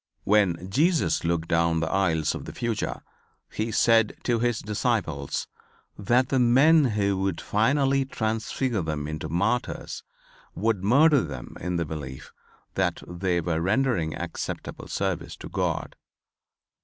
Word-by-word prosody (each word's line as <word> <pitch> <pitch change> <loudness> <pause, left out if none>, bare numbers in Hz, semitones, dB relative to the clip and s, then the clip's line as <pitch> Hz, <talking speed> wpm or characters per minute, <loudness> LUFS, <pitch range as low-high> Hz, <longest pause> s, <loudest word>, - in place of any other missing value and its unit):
When 95 -4 +2
Jesus 155 - +2
looked 85 -1 0
down 85 0 +2
the 80 0 -2
aisles 80 -6 +1
of - - -6
the - - -8
future, 115 -3 -2 0.5
He 110 +1 -2
said 115 0 +3
to 120 -2 +1
His 120 -1 +1
disciples 100 - -1 0.5
that 120 +5 +2
the 135 - +2
men 140 +6 +5
who 100 -4 0
would 95 -3 -1
finally 135 +5 +2
transfigure 110 -1 -1
them 75 -2 -3
into 75 0 -5
martyrs 100 +9 -1 0.5
would 105 -2 0
murder 140 +6 +5
them - - -7
in 90 +1 -3
the 85 -1 0
belief 70 -4 -7 0.4
that - - -1
they 90 0 -1
were 80 -1 -1
rendering 95 -4 +1
acceptable 85 -1 -5
service - - -2
to - - -9
God. - - -2
100 Hz, 135 wpm, -26 LUFS, 85-120 Hz, 0.5 s, men